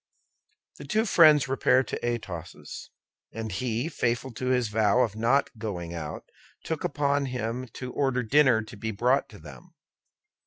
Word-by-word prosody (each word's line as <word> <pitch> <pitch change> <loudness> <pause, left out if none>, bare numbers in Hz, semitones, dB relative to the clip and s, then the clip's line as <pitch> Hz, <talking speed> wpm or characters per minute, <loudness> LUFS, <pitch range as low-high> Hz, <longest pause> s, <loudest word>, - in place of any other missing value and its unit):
The - - -8
two 220 0 +1
friends 155 - +6
repaired 130 0 +2
to - - -5
Athos's, 95 -8 -5 0.4
and 110 -1 -5
he, 115 - -2
faithful 125 -4 -1
to 125 +3 -4
his 125 -3 +1
vow 110 +2 +3
of 110 -4 0
not 120 +6 +2
going 90 -6 -5
out, 80 -3 -6 0.4
took 160 +2 -3
upon 145 -4 0
him 125 0 -3
to 125 -1 -7
order 135 -3 0
dinner 125 -2 +4
to 110 +1 -11
be 110 +2 -4
brought 120 +6 +1
to 105 - -13
them. 70 -9 -14
125 Hz, 155 wpm, -27 LUFS, 110-135 Hz, 0.4 s, friends